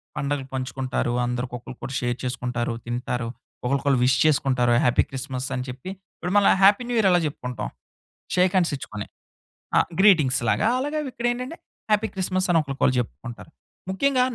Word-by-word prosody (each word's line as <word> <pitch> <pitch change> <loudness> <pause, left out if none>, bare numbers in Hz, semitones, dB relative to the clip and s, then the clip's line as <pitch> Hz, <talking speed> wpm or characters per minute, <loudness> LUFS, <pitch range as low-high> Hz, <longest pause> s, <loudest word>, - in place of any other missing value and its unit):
పండుగలు 140 -1 -2
పంచుకుంటారు. 130 -1 -2
అందరికొకళ్ళకొళ్ళు 125 +1 -5
షేర్ 120 0 -1
చేసుకుంటారు, 125 -1 -2
తింటారు, 120 0 -2 0.4
ఒకళ్ళకొళ్ళు 135 0 +2
విష్ 130 - +3
చేసుకుంటారు, 130 -5 +3
హ్యాపీ 125 - +4
క్రిస్మస్ 135 -1 -4
అని 125 - -2
చెప్పి. 125 +8 -7 0.3
ఇప్పుడు 180 +2 -3
మనలా 205 - +6
హ్యాపీ 200 +5 +6
న్యూ 245 - 0
ఇయర్ 195 - +4
ఎలా 175 - +5
చెప్పుకుంటాం? 125 -5 -5 0.7
షేక్ 180 +1 +3
హ్యాండ్సిచ్చుకొని. 140 - -1 0.7
ఆ! - - +7 0.2
గ్రీటింగ్స్‌లాగా 155 - +4
అలాగే 290 +3 -2
అవిక్కడేంటంటే, 250 +3 -3 0.3
హ్యాపీ 210 +1 +3
క్రిస్మస్ 185 0 0
అని 165 - +5
ఒకళ్ళకొళ్ళు 135 -2 0
చెప్పుకుంటారు. 120 +4 -7 0.4
ముఖ్యంగా 255 +6 +2
135 Hz, 135 wpm, -24 LUFS, 125-185 Hz, 0.7 s, ఆ